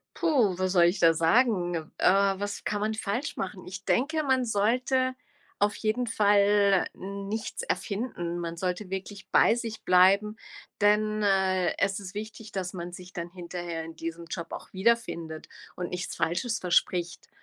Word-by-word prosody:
Puh, 250 Hz, -, +2 dB
was 185 Hz, 0 st, 0 dB
soll 175 Hz, -3 st, +5 dB
ich 175 Hz, +4 st, +2 dB
da 165 Hz, -1 st, +6 dB
sagen? 175 Hz, +1 st, +2 dB, 0.2 s
Äh, -, -, -2 dB, 0.3 s
was 205 Hz, 0 st, -4 dB
kann 205 Hz, -1 st, -1 dB
man 215 Hz, +1 st, 0 dB
falsch 220 Hz, +6 st, -3 dB
machen? 185 Hz, -1 st, -5 dB
Ich 190 Hz, +2 st, -8 dB
denke, 310 Hz, +5 st, +1 dB
man 260 Hz, -3 st, +2 dB
sollte 250 Hz, +4 st, +1 dB, 0.4 s
auf 205 Hz, 0 st, +2 dB
jeden 235 Hz, +3 st, -1 dB
Fall 205 Hz, -2 st, +4 dB
nichts 200 Hz, +3 st, -5 dB
erfinden. 195 Hz, -6 st, -3 dB
Man 170 Hz, -1 st, -4 dB
sollte 185 Hz, +2 st, -3 dB
wirklich 195 Hz, +1 st, -6 dB
bei -, -, +5 dB
sich 230 Hz, -2 st, -5 dB
bleiben, 195 Hz, +4 st, +4 dB, 0.4 s
denn, 215 Hz, +1 st, +3 dB
äh, 190 Hz, -2 st, +2 dB
es 195 Hz, 0 st, +1 dB
ist 195 Hz, 0 st, -9 dB
wichtig, 215 Hz, +1 st, -7 dB
dass 185 Hz, -2 st, -3 dB
man 175 Hz, 0 st, -6 dB
sich 180 Hz, 0 st, -11 dB
dann 170 Hz, 0 st, -5 dB
hinterher 175 Hz, -2 st, -5 dB
in 165 Hz, -, -9 dB
diesem 165 Hz, +1 st, -6 dB
Job 165 Hz, 0 st, -5 dB
auch -, -, -8 dB
wiederfindet 190 Hz, -6 st, -1 dB, 0.3 s
und 175 Hz, -1 st, -3 dB
nichts 180 Hz, 0 st, -4 dB
Falsches 220 Hz, +8 st, -1 dB
verspricht. 175 Hz, -1 st, 0 dB
195 Hz, 160 wpm, -28 LUFS, 180-215 Hz, 0.4 s, da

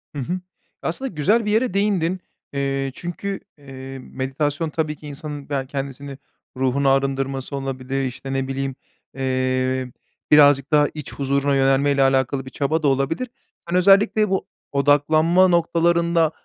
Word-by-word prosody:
Hı -, -, -3 dB
hı. 180 Hz, +8 st, -2 dB, 0.4 s
Aslında 265 Hz, +11 st, -3 dB
güzel 205 Hz, +8 st, +1 dB
bir 210 Hz, -, 0 dB
yere 220 Hz, -2 st, +1 dB
değindin. 190 Hz, -3 st, +1 dB, 0.3 s
Eee, 135 Hz, -1 st, -1 dB
çünkü, 195 Hz, +3 st, -5 dB, 0.2 s
eee, 135 Hz, -1 st, -9 dB
meditasyon 140 Hz, +5 st, -2 dB
tabii 155 Hz, -1 st, -2 dB
ki 150 Hz, -, -11 dB
insanın 145 Hz, -1 st, -7 dB
ya 135 Hz, -2 st, -1 dB
kendisini 140 Hz, 0 st, -6 dB, 0.4 s
ruhunu 135 Hz, +1 st, +2 dB
arındırması 135 Hz, 0 st, 0 dB
olabilir, 135 Hz, 0 st, -3 dB
işte 135 Hz, +1 st, -5 dB
ne 135 Hz, 0 st, -1 dB
bileyim, 135 Hz, 0 st, -3 dB, 0.4 s
eee, 130 Hz, -1 st, 0 dB, 0.4 s
birazcık 145 Hz, -1 st, +6 dB
daha 150 Hz, -1 st, +5 dB
iç 150 Hz, -3 st, -8 dB
huzuruna 140 Hz, 0 st, 0 dB
yönelme 135 Hz, +1 st, +3 dB
ile 140 Hz, -1 st, +2 dB
alakalı 135 Hz, 0 st, +1 dB
bir -, -, -8 dB
çaba 155 Hz, +3 st, -1 dB
da -, -, +3 dB
olabilir. 140 Hz, -, 0 dB, 0.4 s
Sen 175 Hz, -, 0 dB
özellikle 200 Hz, +2 st, +4 dB
bu 190 Hz, -, -1 dB, 0.2 s
odaklanma 155 Hz, +6 st, +4 dB
noktalarında, 170 Hz, -1 st, +2 dB
140 Hz, 140 wpm, -22 LUFS, 135-165 Hz, 0.4 s, birazcık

